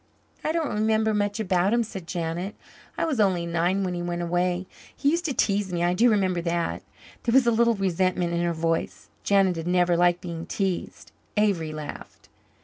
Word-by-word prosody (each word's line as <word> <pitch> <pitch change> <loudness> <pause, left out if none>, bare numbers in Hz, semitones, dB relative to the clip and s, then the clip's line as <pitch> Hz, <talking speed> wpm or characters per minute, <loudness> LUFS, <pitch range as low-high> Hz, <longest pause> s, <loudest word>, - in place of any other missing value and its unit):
"I 310 - 0
don't 320 -2 -1
remember 220 +1 +2
much 205 0 0
about 190 0 +2
him," 235 - +2
said 190 -6 -8
Janet. 175 +3 -3 0.4
"I - - +1
was 300 -7 -1
only 185 -4 +2
nine 175 +3 0
when 180 -1 -2
he 175 - -3
went 175 0 -3
away. 175 +1 0 0.3
He 285 - +2
used 340 +2 -1
to 290 - 0
tease 200 -2 +1
me 175 -1 -1
I 175 0 +2
do 235 +7 +4
remember 190 -5 +1
that." 170 0 -1 0.4
There 230 - 0
was 265 -1 +6
a 235 - +4
little 235 0 +3
resentment 185 -2 0
in 170 - 0
her 175 0 +1
voice. 165 0 -2
Janet 195 -3 +3
had 165 +1 -4
never 175 -1 +3
liked 175 0 +3
being 170 -1 -6
teased. 190 -3 -3 0.3
Avery 190 -7 +1
laughed. 155 -1 -9
185 Hz, 195 wpm, -25 LUFS, 175-210 Hz, 0.4 s, was